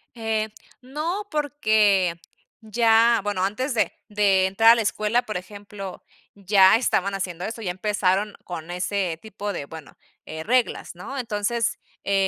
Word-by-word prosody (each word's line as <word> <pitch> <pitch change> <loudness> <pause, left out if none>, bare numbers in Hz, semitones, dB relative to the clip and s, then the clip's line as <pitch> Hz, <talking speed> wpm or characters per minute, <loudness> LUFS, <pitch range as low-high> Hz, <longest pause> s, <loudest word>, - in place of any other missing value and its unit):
Eh, 220 -1 -1 0.3
no, 325 +10 -4
porque 215 - +2 0.4
ya 225 +1 +4
bueno, 205 -3 -1
antes 255 +7 -1
de 220 - +1 0.2
de 200 -2 +3
entrar 225 +4 +6
a - - +7
la 230 - 0
escuela, 215 +3 0
por 215 - -5
ejemplo, 200 0 -9 0.3
ya 195 0 +5
estaban 200 -5 0
haciendo 180 -2 -4
eso. 225 +1 -6
Ya 180 -4 -2
empezaron 200 +1 0
con 175 -1 -7
ese 180 -2 -2
tipo 205 -1 -5
de 140 - -5
bueno, 160 -1 -12 0.3
eh, 160 0 -6
reglas, 245 -5 0
¿no? 270 +10 -7
Entonces, 230 0 -1 0.3
eh 195 -1 +2
210 Hz, 145 wpm, -24 LUFS, 190-230 Hz, 0.4 s, a